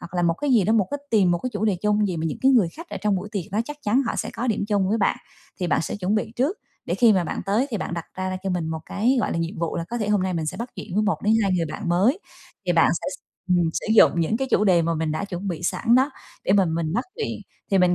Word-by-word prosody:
Hoặc 170 - -10
là 175 - +1
một 165 -1 +2
cái 290 +7 -2
gì 230 -7 +4
đó, 220 - +2
một 210 -5 +3
cái 285 - -2
tìm 200 -5 +4
một 175 - +2
cái 255 - -4
chủ - - -2
đề 205 -4 +2
chung 210 0 +2
gì 180 - -2
mà 160 - -3
những 155 - -4
cái 265 +1 +5
người 225 -9 +4
khách 335 +2 -9
ở - - -5
trong 210 -2 +1
buổi 190 +3 -5
tiệc 195 -6 -4
đó 210 - +1
chắc 295 +4 -7
chắn 240 +6 +2
họ - - -2
sẽ - - -2
có 245 - -4
điểm 215 -3 0
chung 200 -3 +1
với 225 +3 +1
bạn. 195 - +2 0.4
Thì 180 - 0
bạn - - +2
sẽ - - -4
chuẩn 195 +1 -1
bị 220 +1 -1
trước 285 - +1 0.3
để - - -1
khi 235 -3 +5
mà 185 -3 +2
bạn - - -3
tới, 215 +7 +2
thì 220 - -1
bạn 180 - -4
đặt 170 -1 -4
ra 185 0 -3
cho 195 - -2
mình 175 -3 -1
một 160 0 -3
cái, 240 +7 +1
gọi - - -1
là, - - -1
nhiệm 165 +3 -3
vụ 170 -1 -2
là 170 - -2
có 240 +1 -3
thể 210 -2 -2
hôm 205 -3 +2
nay 185 -1 -1
mình 160 -2 -2
sẽ - - -3
bắt 235 +2 -4
chuyện 175 - -7
với 210 - +2
1 210 -1 0
đến 215 +1 +3
2 195 -2 +1
người 165 -2 0
bạn 205 -4 -5
mới. 200 - +3 0.5
Thì - - +3
bạn - - +4
sẽ - - -4 0.4
ừm, 175 -2 +3
sử - - -3
dụng 170 -5 +6
những 165 +7 +1
cái 265 +1 -2
chủ 210 - +3
đề 180 -4 +4
mà 165 +1 0
mình 155 -1 -1
đã 180 +6 -2
chuẩn 195 0 -5
bị 175 -1 -4
sẵn 230 +6 +2
đó 265 +4 +4 0.3
để - - +2
mà 195 -1 +5
mình 165 -1 -1
bắt 240 +7 0
chuyện. 450 - -3 0.3
Thì 195 - +3
mình 180 -1 +4
195 Hz, 325 wpm, -24 LUFS, 175-225 Hz, 0.5 s, dụng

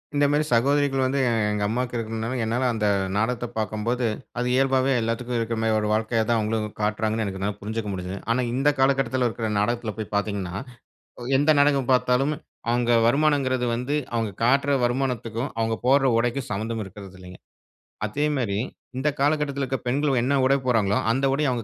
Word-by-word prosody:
இந்த 145 0 +3
மாதிரி 150 +1 +2
சகோதரிகள் 135 +2 +2
வந்து, 135 +2 0 0.3
எங்க 105 0 -1
அம்மாக்கு 125 +3 -2
இருக்கணும்னால, 115 +2 -3
என்னால 115 +3 -1
அந்த 110 -2 -1 0.3
நாடகத்த 120 +3 0
பாக்கும்போது, 110 +4 -1 0.3
அது 125 - 0
இயல்பாவே 135 0 +2
எல்லாத்துக்கும் 120 +2 -2
இருக்கிற 115 0 -2
மாதிரி 110 -1 +2
ஒரு 105 - -1
வாழ்க்கைய 110 +1 +1
தான் 115 -1 +3
அவங்களும் 105 0 -2
காட்றாங்கன்னு 110 +1 0
எனக்கு 95 -1 -5
என்னால 100 +1 -2
புரிஞ்சுக்க 110 +1 -4
முடிஞ்சுது. 95 +1 -5
ஆனா 125 +2 +2
இந்த 135 +3 +2
காலகட்டத்தில 130 -2 +2
இருக்கிற 110 -1 -3
நாடகத்தில 115 +1 -1
போய் 105 -1 -6
பார்த்தீங்கன்னா, 100 -3 -2 0.8
எந்த 145 +3 +3
நாடகம் 140 -3 +3
பாத்தாலும், 130 +3 +2 0.4
அவங்க 120 0 +2 0.2
வருமானங்கிறது 135 -2 +2
வந்து, 125 +5 -2 0.2
அவங்க 115 -3 -1
காட்டுற 140 +3 +3
வருமானத்துக்கும், 120 -1 -2
அவங்க 115 0 0
போடுற 135 +1 +4
உடைக்கும் 120 +2 -1
சம்மந்தம் 110 +2 -3
இருக்குறது 95 -1 -11
இல்லைங்க. 90 0 -11 0.7
அதே 125 +8 -2
மாரி, 110 -7 -1 0.4
இந்த 140 +3 +1
காலகட்டத்தில 145 -1 0
இருக்குற 135 0 -2
பெண்கள் 135 +2 +1
என்ன 130 +4 +1
உடை 135 +1 +4
போடுறாங்களோ, 110 -5 +2
அந்த 135 +4 +1
உடைய 145 0 +1
அவுங்க 120 -2 -2
120 Hz, 165 wpm, -24 LUFS, 110-135 Hz, 0.8 s, போடுற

